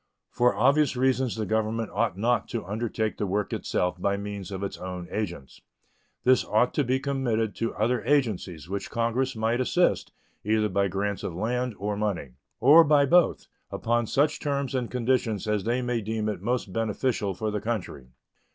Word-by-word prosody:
For 125 0 +2
obvious 140 +3 +3
reasons 130 -1 +1
the 110 -1 -2
Government 110 +2 -1
ought 105 -3 0
not 120 +4 +1
to 115 -6 -4
undertake 110 +2 -2
the 105 - 0
work 100 +2 -1
itself 90 0 -1
by 100 +1 +1
means 100 -2 -6
of 95 0 -5
its 100 - -4
own 90 -1 -6
agents. 85 -10 -5 0.6
This 130 0 +4
ought 115 +4 +2
to 145 - +1
be 130 +1 +1
committed 125 -6 -1
to 115 - -2
other 120 +3 0
agencies, 110 - 0
which 100 +1 -4
Congress 120 +3 0
might 115 +3 0
assist, 175 +7 +1 0.3
either 110 0 +1
by 100 +1 +1
grants 100 +2 -2
of 85 - -5
land 120 +4 -1
or 105 +1 -2
money, 100 -10 -2 0.3
or 150 +7 +8
by 145 -2 +4
both, 175 +4 +3 0.2
upon 120 0 0
such 150 +5 +1
terms 140 -3 -2
and 125 -3 -1
conditions 120 -4 0
as 105 -2 0
they 120 +2 0
may 120 -1 -1
deem 110 0 -2
most 115 -3 -2
beneficial 110 -2 -1
for 110 +3 -2
the 105 -1 -2
country. 105 - -4
110 Hz, 175 wpm, -26 LUFS, 100-125 Hz, 0.6 s, or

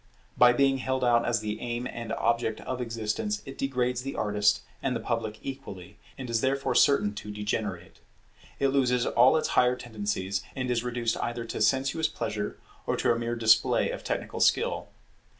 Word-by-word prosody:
By 125 0 +7
being 135 +1 +2
held 130 0 -1
out 120 -1 +3
as 120 -2 +1
the 105 0 -4
aim 120 0 -3
and 115 -3 -6
object 115 -1 0
of 130 -1 -4
existence, 115 - -2
it 135 -1 -8
degrades 125 -2 -1
the 135 +1 -5
artist 105 0 +2 0.2
and 130 -2 -1
the - - -1
public 110 -1 -3
equally, 100 -8 -8 0.2
and 130 - -6
is 115 -1 0
therefore 135 +1 0
certain 140 -8 +4
to 105 0 -8
degenerate. 105 -3 -4 0.6
It 140 - +3
loses 125 -3 +2
all 125 +6 +5
its 155 - -1
higher 125 0 +3
tendencies, 105 -5 -3
and 130 -2 -2
is 120 -1 0
reduced 120 -2 -1
either 120 0 -3
to - - -5
a - - -4
sensuous 135 +7 +2
pleasure, 105 -3 -4 0.3
or - - 0
to - - +2
a 115 - +1
mere 120 0 -2
display 115 -1 +3
of - - -6
technical - - -3
skill. - - +2
120 Hz, 185 wpm, -28 LUFS, 110-130 Hz, 0.6 s, By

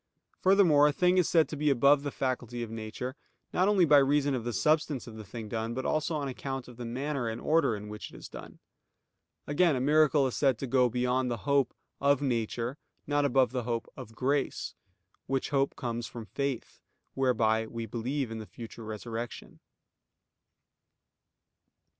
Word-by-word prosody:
Furthermore, 180 -7 +5
a - - +3
thing 180 +4 +3
is 180 - +2
said 165 -2 +4
to - - -4
be 150 +1 +1
above 140 +2 +5
the 145 - -3
faculty 125 -3 -3
of 115 - -7
nature, 115 +4 -5 0.4
not 185 +2 +3
only 200 -4 +5
by 150 -2 +7
reason 140 +1 +2
of 125 -3 -2
the 120 - -2
substance 150 +2 +1
of 115 - -10
the 110 - -8
thing 110 +2 -7
done, 115 +1 -3
but 130 - -3
also 155 +1 0
on 145 -2 -2
account 135 0 -5
of 125 -2 -13
the 120 - -6
manner 130 +1 -2
and 110 +1 -4
order 155 -8 +2
in 105 0 -7
which 105 0 -8
it - - -12
is - - -9
done. - - -10 0.9
Again, 150 +1 +3
a - - -1
miracle 150 +1 +4
is 130 - -2
said 135 -5 +2
to 135 - -4
go 125 -1 +3
beyond 125 +2 0
the 120 -1 -4
hope 140 -2 +2 0.2
"of 140 -1 +3
nature," 120 0 -2 0.3
not 145 -1 +1
above 130 -2 +3
the 125 -1 -1
hope 115 -1 -3
"of 110 - -10
grace," 135 +2 -1 0.5
which 135 +2 -1
hope 140 -1 +1
comes 120 -1 -3
from 115 -2 -8
faith, 140 0 -4 0.3
whereby 110 -4 +2
we 115 0 -5
believe 120 +3 -3
in 110 - -5
the 110 - -8
future 115 0 -9
resurrection. 115 +2 -6
130 Hz, 185 wpm, -29 LUFS, 115-145 Hz, 0.9 s, by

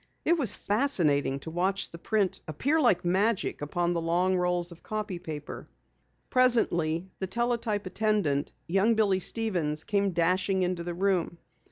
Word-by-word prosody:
It 340 - +4
was 265 - +6
fascinating 165 - +1
to 160 - -7
watch 190 +3 0
the 170 - -10
print 205 0 -1
appear 280 - 0
like 185 - +2
magic 195 +3 0
upon 175 +4 -1
the 170 - -2
long 175 +3 +1
rolls 180 -1 0
of 170 - -13
copy 210 -4 -4
paper. 155 -4 -8 0.6
Presently, 190 - +2
the 190 - -3
teletype 230 -1 -1
attendant, 185 -8 0
young 195 +6 +2
Billy 200 -4 +2
Stevens, 175 -8 -1
came 200 -2 0
dashing 185 +2 +1
into 180 -1 -2
the 175 0 -5
room. 180 -2 0
185 Hz, 150 wpm, -28 LUFS, 170-215 Hz, 0.6 s, was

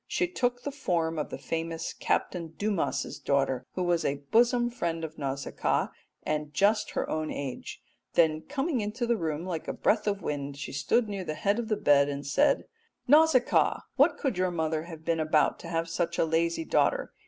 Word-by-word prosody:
She 360 - 0
took 245 -7 -1
the 285 - -3
form 165 - -1
of 150 - -3
the - - -5
famous 165 +4 -3
Captain 165 -3 -2
Dumas's 205 -2 -1
daughter, 135 -2 0
who 185 - -1
was 175 -1 +1
a 140 0 -2
bosom 240 +1 +4
friend 170 -8 -2
of 160 -1 -6
Nausicaa 135 -1 -1 0.3
and 150 -1 -2
just 210 +2 +2
her - - 0
own 155 0 -2
age; 135 -3 -6 0.3
then 155 -2 +3
coming 275 - -1
into 215 +4 -2
the 235 0 +2
room 160 -4 -3
like 170 -4 -4
a - - -2
breath 215 0 +1
of 200 -1 -1
wind 140 -1 -3
she 145 - -6
stood 145 - +1
near 200 -2 -4
the 155 -3 -4
head 200 +7 +1
of 235 - -3
the 215 -2 0
bed 145 -1 +4
and 140 0 -4
said 140 - +2 0.4
"'Nausicaa, 295 -2 +4
what - - +4
could 255 -10 -1
your 185 0 +2
mother 160 -2 -1
have 160 -2 -10
been 165 -1 +1
about 155 -1 +2
to 170 - -9
have 165 0 -1
such 170 0 -2
a - - +3
lazy 165 - 0
daughter? - - +1
170 Hz, 195 wpm, -28 LUFS, 155-215 Hz, 0.4 s, bosom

